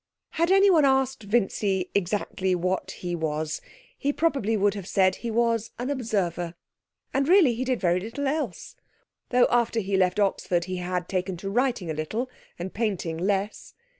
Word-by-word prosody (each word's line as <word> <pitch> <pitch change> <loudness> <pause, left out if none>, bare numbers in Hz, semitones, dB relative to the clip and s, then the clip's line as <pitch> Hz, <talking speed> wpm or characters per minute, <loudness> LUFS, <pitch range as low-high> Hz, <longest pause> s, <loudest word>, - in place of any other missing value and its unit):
Had 335 +1 +1
anyone 385 -4 +6
asked 265 -2 +2
Vincy 200 -3 0
exactly 190 -1 0
what 185 +1 -1
he 175 -1 -5
was 155 -1 -2 0.3
he 280 - -2
would 285 - -1
probably 270 -10 +1 0.2
have 200 -3 -7
said 190 -2 +2
he 235 - -5
was 230 -1 +1
an 250 +4 -2
Observer, 180 -10 -2 0.6
and 275 +1 +1
really 345 -8 +6
he 240 +3 -2
did 255 -2 0
very 175 -1 +2
little 230 +9 -4
else, 305 +3 -3 0.5
though 250 0 +5
after 235 -1 +2
he 200 -2 -1
left 185 +1 +2
Oxford 185 -3 +1
he 185 -1 -4
had 180 0 -3
taken 185 -1 -2
to 195 +3 -5
writing 240 -7 0
a - - -2
little, 215 +12 -3 0.3
and 180 +2 -5
painting 195 -7 -1
less. 200 +3 -2
205 Hz, 165 wpm, -26 LUFS, 180-250 Hz, 0.6 s, anyone